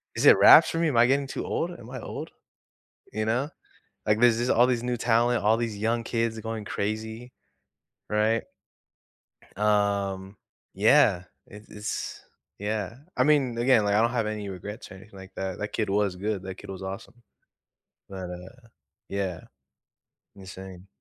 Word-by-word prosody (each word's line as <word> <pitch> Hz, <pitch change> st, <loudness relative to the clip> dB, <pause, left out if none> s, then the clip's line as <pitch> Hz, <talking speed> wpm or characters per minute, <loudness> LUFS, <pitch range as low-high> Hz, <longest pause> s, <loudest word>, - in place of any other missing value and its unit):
"is -, -, 0 dB
it -, -, +8 dB
wraps -, -, +8 dB
for 165 Hz, -, -2 dB
me? 165 Hz, -1 st, +2 dB
Am 130 Hz, -, -1 dB
I 120 Hz, +1 st, +6 dB
getting 140 Hz, +1 st, +1 dB
too -, -, -5 dB
old? 170 Hz, -, -2 dB
Am 120 Hz, -8 st, -11 dB
I 130 Hz, -, -6 dB
old?" -, -, -7 dB, 0.8 s
You 110 Hz, +1 st, -2 dB
know? 125 Hz, +7 st, 0 dB, 0.6 s
Like, 105 Hz, +1 st, +2 dB
these 120 Hz, -2 st, +5 dB
these 120 Hz, +1 st, -1 dB
all 120 Hz, +2 st, +5 dB
these 120 Hz, -2 st, 0 dB
new 125 Hz, -1 st, -1 dB
talent, 120 Hz, 0 st, +2 dB
all 110 Hz, +2 st, +4 dB
these 115 Hz, -3 st, -3 dB
young 115 Hz, +2 st, 0 dB
kids 115 Hz, -1 st, -1 dB
going 110 Hz, -1 st, -5 dB
crazy. 110 Hz, +4 st, -4 dB, 0.8 s
Right? 110 Hz, +1 st, +1 dB, 1.1 s
Um, 100 Hz, -2 st, 0 dB, 0.4 s
yeah. 90 Hz, +1 st, +4 dB, 0.2 s
It 105 Hz, +1 st, -13 dB
it's 105 Hz, 0 st, -5 dB, 0.4 s
yeah. 105 Hz, +1 st, -3 dB, 0.2 s
I -, -, +3 dB
mean, 135 Hz, -6 st, +2 dB
again, 120 Hz, -3 st, +4 dB
like, 100 Hz, -, +1 dB
I 105 Hz, -, +4 dB
don't 115 Hz, +1 st, +3 dB
have 115 Hz, -3 st, -1 dB
any 105 Hz, -2 st, -4 dB
regrets 100 Hz, +4 st, -8 dB
or -, -, -9 dB
anything 95 Hz, +1 st, -14 dB
like 95 Hz, 0 st, -12 dB
that, 95 Hz, -1 st, -4 dB
that 105 Hz, -, -4 dB
kid 105 Hz, -3 st, -1 dB
was 100 Hz, -2 st, +1 dB
good, 100 Hz, 0 st, -3 dB
that 95 Hz, -1 st, -6 dB
kid -, -, -11 dB
was 95 Hz, 0 st, -7 dB
awesome. 100 Hz, +5 st, -8 dB, 0.9 s
But, 95 Hz, -2 st, -7 dB
uh, 105 Hz, +7 st, -11 dB, 0.4 s
yeah. 95 Hz, -3 st, -3 dB, 0.9 s
Insane. 95 Hz, -1 st, -11 dB
110 Hz, 170 wpm, -26 LUFS, 100-120 Hz, 1.1 s, it